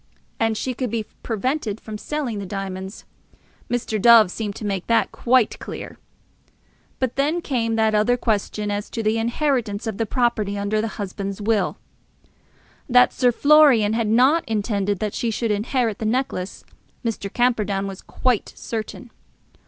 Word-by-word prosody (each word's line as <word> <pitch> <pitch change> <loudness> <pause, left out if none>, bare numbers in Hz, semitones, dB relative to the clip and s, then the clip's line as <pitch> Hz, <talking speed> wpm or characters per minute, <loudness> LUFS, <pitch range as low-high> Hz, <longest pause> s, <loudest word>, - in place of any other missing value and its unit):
And 225 -1 +1
she 255 - -2
could 250 0 -3
be 225 0 -2 0.2
prevented 225 -1 -2
from 215 -1 -8
selling 270 -8 -3
the 200 - -5
diamonds. 190 0 -6 0.6
Mr. 225 -3 -1
Dove 230 -4 +7
seemed 210 -1 -4
to 215 - -6
make 195 -3 -2
that 230 - +2
quite 250 -2 +2
clear. - - -8 1.0
But 260 -1 -2
then 290 +4 +2
there 350 - -2
came 230 -7 -1
that 220 -1 +2
other 215 +4 +3
question, 210 -2 -1
as 205 +1 -3
to 225 - -4
the 215 +1 +1
inheritance 235 -3 -1
of 220 -2 -4
the 225 - 0
property 220 -4 0
under 205 +2 0
the 225 - -1
husband's 200 -1 -4
will. 210 0 0 1.1
That 250 0 +5
Sir 250 -2 +3
Florian 275 -6 +5
had 225 -1 0
not 260 +9 +4
intended 205 -2 0
that 210 +2 -3
she 235 - -1
should 225 0 -1
inherit 220 +1 0
the 220 - -3
necklace, 220 -6 -2 0.4
Mr. 205 -3 -3
Camperdown 210 -5 +1
was 195 -1 -7
quite 250 -5 -1
certain. 230 +2 -6
225 Hz, 160 wpm, -22 LUFS, 205-245 Hz, 1.1 s, Dove